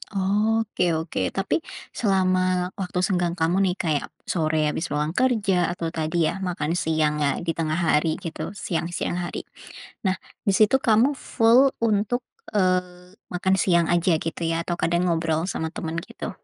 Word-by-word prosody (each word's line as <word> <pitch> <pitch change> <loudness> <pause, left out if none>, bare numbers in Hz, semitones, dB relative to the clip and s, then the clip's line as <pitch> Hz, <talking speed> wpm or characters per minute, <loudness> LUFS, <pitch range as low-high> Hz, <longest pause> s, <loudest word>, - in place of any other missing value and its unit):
Oke 205 -2 +1
oke, 160 +1 -3 0.2
tapi 195 +11 0 0.3
selama 185 -3 +1
waktu 180 -1 -2
senggang 175 -2 +1
kamu 170 +2 +1
nih 180 - 0
kayak 155 -4 0 0.2
sore 155 -2 0
habis 170 - -3
pulang 150 +1 -1
kerja 200 -6 +2
atau 170 -2 -4
tadi 160 +1 -2
ya 195 - -6
makan 175 -5 -2
siangnya 150 -2 +1 0.2
di 165 - 0
tengah 160 -1 -1
hari 160 -2 +2
gitu, 170 +4 -5
siang-siang 175 -2 -2
hari, - - -5 0.6
nah 185 - +3 0.3
di 200 - +4
situ 215 +6 +5
kamu 225 0 +4
full 250 +3 +4
untuk, 220 +3 +1 0.3
eee, 180 -1 0 0.2
makan 190 +1 +2
siang 170 -3 +3
aja 175 0 +3
gitu 165 +1 -4
ya 165 0 0
atau 175 0 -3
kadang 170 +1 +1
ngobrol 165 -1 0
sama 160 -2 -2
temen 165 0 -4
gitu? - - -6
180 Hz, 155 wpm, -24 LUFS, 165-195 Hz, 0.6 s, situ